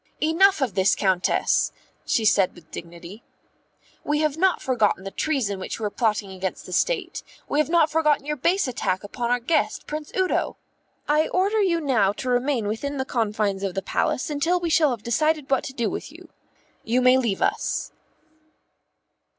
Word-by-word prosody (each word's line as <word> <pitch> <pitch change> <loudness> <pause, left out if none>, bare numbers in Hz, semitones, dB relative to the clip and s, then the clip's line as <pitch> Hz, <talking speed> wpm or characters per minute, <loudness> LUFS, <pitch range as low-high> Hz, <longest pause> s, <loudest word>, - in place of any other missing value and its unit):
"Enough 335 +3 +3
of 250 -7 0
this, 190 +1 +3
Countess," 190 -2 +1 0.4
she 225 - +1
said 195 -3 +3
with 165 -3 -17
dignity. 170 +5 -9 0.8
"We 295 - 0
have 305 -2 +1
not 370 +3 +2
forgotten 220 -7 +1
the 195 - -6
treason 240 -11 -1
which 185 - -5
you 225 - -7
were 210 - -1
plotting 210 -4 -1
against 190 0 -5
the 180 - -8
State; - - 0 0.3
we 290 - 0
have 305 - +1
not 330 -2 +3
forgotten 300 -3 +2
your 300 0 -2
base 345 +5 +1
attack 190 -6 -2
upon 235 +4 -4
our 245 0 +2
guest, 255 +7 0
Prince 300 0 -6
Udo. 375 -1 0 0.5
I 300 +1 +3
order 400 +4 +1
you 350 -4 +2
now 230 -10 +2
to 255 - -5
remain 245 -3 0
within 280 +7 -3
the 265 - -2
confines 210 -5 -1
of 195 -2 -3
the 195 - -2
Palace 255 - -1
until 330 +5 +1
we 340 -2 -2
shall 310 -2 +4
have 235 -5 -4
decided 300 +4 0
what 270 - +2
to - - -5
do 235 -4 -1
with - - -5
you. - - -14 0.5
You 235 +3 +1
may 255 +1 +6
leave 225 -7 -1
us." - - -1
255 Hz, 185 wpm, -24 LUFS, 205-310 Hz, 0.8 s, may